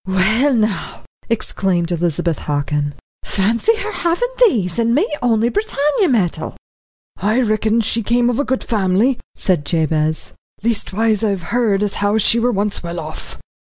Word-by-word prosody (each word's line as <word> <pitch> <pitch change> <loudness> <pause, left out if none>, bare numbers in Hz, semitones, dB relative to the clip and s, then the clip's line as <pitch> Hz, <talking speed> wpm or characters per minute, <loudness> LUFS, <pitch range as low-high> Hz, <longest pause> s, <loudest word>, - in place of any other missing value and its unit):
"Well, 215 +9 +2
now," 215 -3 -1 0.3
exclaimed 190 -6 -1
Elizabeth 170 -1 0
Hockin, 145 0 -2 0.3
"fancy 230 - +1
her 435 0 -4
havin' 350 +6 0 0.2
these 195 - -1
and 230 +1 +2
me 365 +10 +2
only 230 -1 +2
Britannia 300 - +1
metal." 210 - -1 0.6
"I 215 +6 +1
reckon 220 0 +1
she 225 +1 -1
came 240 +2 +2
of 245 +1 0
a - - +2
good 260 -2 -1
family," 215 +4 +1 0.2
said 180 -6 +1
Jabez. 155 -1 0 0.3
"Leastwise, 220 -1 0
I've 200 -5 0
heard 215 -5 +2
as 205 - -1
how 205 +1 +2
she 220 +2 +3
were 245 +2 +2
once 205 -1 -1
well 170 0 -5
off." 155 -1 -7
215 Hz, 150 wpm, -18 LUFS, 180-240 Hz, 0.6 s, she